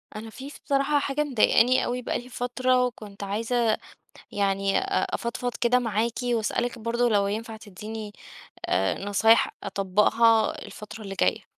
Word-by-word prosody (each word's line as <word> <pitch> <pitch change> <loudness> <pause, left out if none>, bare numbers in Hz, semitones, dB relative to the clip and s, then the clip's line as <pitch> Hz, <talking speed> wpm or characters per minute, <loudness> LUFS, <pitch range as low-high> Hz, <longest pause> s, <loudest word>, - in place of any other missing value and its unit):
أنا 220 +1 -7
في 265 +5 -9
ف - - -13
بصراحة 285 +1 +2
حاجة 280 +1 -1
مضايقاني 255 -2 +3
أوي 250 +1 -2
بقى - - -2
لي 245 - -12
فترة، 250 +1 +1
وكنت 210 -5 -7
عايزة 225 +3 0 0.6
يعني 195 -1 +1
أ 390 0 -1
أفضفض 245 +1 -3
كده 245 +1 +4
معاكِ، 230 -1 -1
وأسألِك 240 0 -1
برضه 235 +2 0
لو 205 -3 +2
ينفع 220 +2 -4
تديني 215 +1 -8 0.5
آآ، 95 - 0
نصايح 220 +3 +3
أطبَّقها 210 +3 +2
الفترة 215 +1 -10
اللي 195 -2 -6
جاية. - - +1
230 Hz, 145 wpm, -26 LUFS, 210-245 Hz, 0.6 s, كده